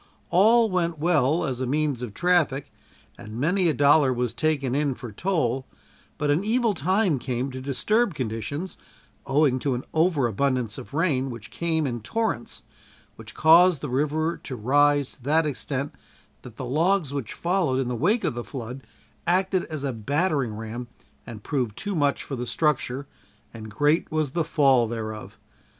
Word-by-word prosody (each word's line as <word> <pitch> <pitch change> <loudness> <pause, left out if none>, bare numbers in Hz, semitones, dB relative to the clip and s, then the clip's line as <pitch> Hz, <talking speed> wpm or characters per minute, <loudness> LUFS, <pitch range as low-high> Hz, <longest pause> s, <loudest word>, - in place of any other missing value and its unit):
All 225 +6 +5
went 170 -4 -1
well 160 0 +2
as 130 -3 -3
a 130 - -1
means 145 -2 0
of 115 -4 -6
traffic 170 -6 +1 0.5
and 110 +2 -8
many 180 +5 +2
a - - +2
dollar 145 0 +5
was 125 -2 -1
taken 140 -2 0
in 140 -1 0
for 120 -3 -8
toll, 130 - -1 0.5
but 150 -1 +1
an 155 +6 +1
evil 230 0 +2
time 185 -1 +1
came 130 +1 -3
to 130 0 -7
disturb 185 - +1
conditions, 130 - -4 0.5
owing 135 -1 +3
to 135 -1 0
an 125 - -4
over 160 -4 +2
abundance 125 0 -1
of 130 +2 -10
rain 145 -6 +1
which 115 -3 -9
came 160 -2 0
in 120 -4 -3
torrents, 220 - -3 0.5
which - - -11
caused 165 0 +6
the - - -4
river 155 +5 0
to 130 - -7
rise 145 +4 +2
to - - -23
that 155 +5 +2
extent 140 -1 -3 0.5
that 120 -3 -12
the 130 - -6
logs 160 +3 +1
which 135 -6 -4
followed 170 -7 0
in 130 - -1
the 125 - -2
wake 205 - +1
of - - 0
the 120 0 -5
flood, 125 0 -8 0.4
acted 185 +1 +2
as 155 -3 -6
a 135 -2 -1
battering 140 - 0
ram 115 +3 -6 0.4
and 110 -3 -9
proved 125 -8 -2
too 205 - -3
much 145 -5 +1
for 135 - -5
the 125 -1 -4
structure 140 -3 0 0.5
and 110 -1 -8
great 145 +9 +1
was 155 -3 0
the 170 +3 0
fall 135 -6 +3
thereof. 110 -1 -6
140 Hz, 170 wpm, -25 LUFS, 125-165 Hz, 0.5 s, caused